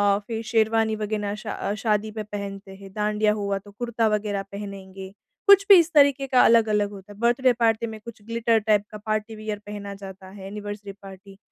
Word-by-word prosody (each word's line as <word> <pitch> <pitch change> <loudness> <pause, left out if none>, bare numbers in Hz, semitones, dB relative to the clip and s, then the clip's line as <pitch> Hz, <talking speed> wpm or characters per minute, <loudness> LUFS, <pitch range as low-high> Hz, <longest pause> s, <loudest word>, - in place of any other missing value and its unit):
अ, - - -2
फिर 225 -1 -3
शेरवानी 220 0 +2
वग़ैरह 210 -1 -3
शा 210 -1 -4
शादी 215 0 -1
में 215 - -3
पहनते 200 -1 -7
हैं, 195 0 -13
डाँडिया 210 0 +1
हुआ, 200 -2 -2
तो 205 +1 -12
कुर्ता 230 +1 -1
वग़ैरह 210 -2 -1
पहनेंगे। 195 -1 -8 0.3
कुछ 400 0 +7
भी 400 - +11
इस 335 0 +1
तरीके 280 -2 +4
का 255 -1 +4
अलग-अलग 215 -3 +3
होता 200 0 -11
है। - - -18
बर्थडे 245 +2 +3
पार्टी 230 -1 +1
में 220 -1 -8
कुछ 235 -2 -10
ग्लिटर 230 0 +1
टाइप 210 -1 +2
का 215 - -7
पार्टी 215 +1 -2
वियर 215 -1 -5
पहना 205 -1 -7
जाता 195 -1 -11
है 190 0 -10
एनिवर्सरी 205 0 -7
पार्टी 195 0 -12
210 Hz, 195 wpm, -24 LUFS, 200-225 Hz, 0.3 s, भी